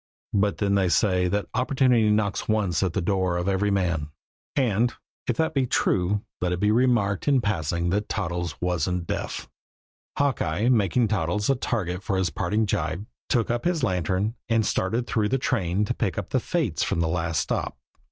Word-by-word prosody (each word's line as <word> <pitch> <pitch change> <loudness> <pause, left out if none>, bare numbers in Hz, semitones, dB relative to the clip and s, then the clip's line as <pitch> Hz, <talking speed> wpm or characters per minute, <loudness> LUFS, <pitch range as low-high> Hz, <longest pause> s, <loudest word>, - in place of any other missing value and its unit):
But 100 0 +2
then 100 -1 +1
they 95 -2 +2
say 90 -1 +2
that 100 +2 0
opportunity 125 -2 +3
knocks 105 -1 0
once 100 -6 +1
at 95 -4 0
the 100 - -1
door 95 -1 +1
of 90 +1 -2
every 100 +1 +1
man; 85 -7 0 0.5
and, 120 -3 +2 0.3
if 125 - 0
that 160 - +1
be 135 -3 +1
true, 100 -1 +1 0.2
let 90 -1 0
it 90 - -1
be 105 +2 +3
remarked 115 -4 +2
in 140 -2 +4
passing 85 - -1
that 105 +2 -1
Toddles 85 -4 -3
wasn't 90 0 -1
deaf! - - -4 0.7
Hawkeye, 115 - +1
making 115 0 +3
Toddles 105 +4 0
a - - +2
target 95 -7 -2
for 100 -2 -1
a 95 - +2
parting 105 +5 0
gibe, 85 0 -2 0.2
took 120 -2 +1
up 120 0 -1
his 170 -4 0
lantern 95 +1 0 0.2
and 115 -1 +2
started 110 +7 0
through 110 -4 0
the 135 - +2
train 105 -7 0
to - - -1
pick - - -2
up - - -4
the - - +2
fates - - -1
from - - 0
the 85 - +2
last 80 -1 0
stop. - - -2
100 Hz, 185 wpm, -25 LUFS, 90-115 Hz, 0.7 s, in